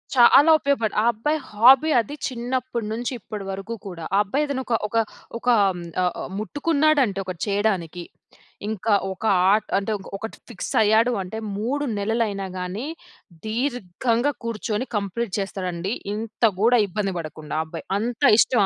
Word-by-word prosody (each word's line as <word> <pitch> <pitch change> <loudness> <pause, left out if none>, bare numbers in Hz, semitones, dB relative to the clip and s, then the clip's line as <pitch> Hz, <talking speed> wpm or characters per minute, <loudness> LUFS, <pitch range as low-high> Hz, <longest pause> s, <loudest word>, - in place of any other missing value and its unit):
చాలా 275 +6 +7
ఉపయోగపడు 275 -6 0
ఆ - - 0
అబ్బాయి 295 +8 -1
హాబీ 255 +8 +6
అది 260 +6 -3
చిన్నప్పటి 245 -2 -3
నుంచి, 240 +3 -3
ఇప్పటి 205 0 -7
వరకు 195 +4 -5
కూడా. 170 -3 -7
ఆ - - +4
అబ్బాయి 280 +9 0
ఏదైనా 270 -2 -3
ఒక 240 - -1
ఒక 230 - -9 0.4
ఒక 250 - -12 0.3
హ్మ్, 175 -1 -7 0.2
ఆహ్, 180 - -1 0.2
ముట్టుకున్నాడంటే 285 - +1
ఒకటి 180 -3 -6
చేయడానికి 190 -4 -1 0.7
ఇంకా 220 0 0 0.2
ఒక 190 - -8 0.3
ఆర్ట్ 215 0 +2
అంటే, 200 +2 -2 0.3
ఒకటి 220 +2 -7
ఫిక్స్ 215 - -5
అయ్యాడు 220 +3 +4
అంటే, 195 +4 -6 0.2
3 260 +8 -1
నెలలైనా 205 -2 -1
గాని, 190 +10 -4 0.6
దీర్ఘంగా 235 +2 0
కూర్చొని 225 +1 -2
కంప్లీట్ 200 +1 -3
చేస్తాడండి. 190 0 -3 0.2
ఇంత 220 +2 -6 0.2
కూడా 240 +1 +5
ఇబ్బంది 195 +1 -2
పడకుండా 155 -2 -7
ఆ - - -1
అబ్బాయి. 165 0 -8
అంత 235 +1 -3 0.2
ఇష్టం 235 -5 +4
220 Hz, 145 wpm, -23 LUFS, 195-245 Hz, 0.7 s, చాలా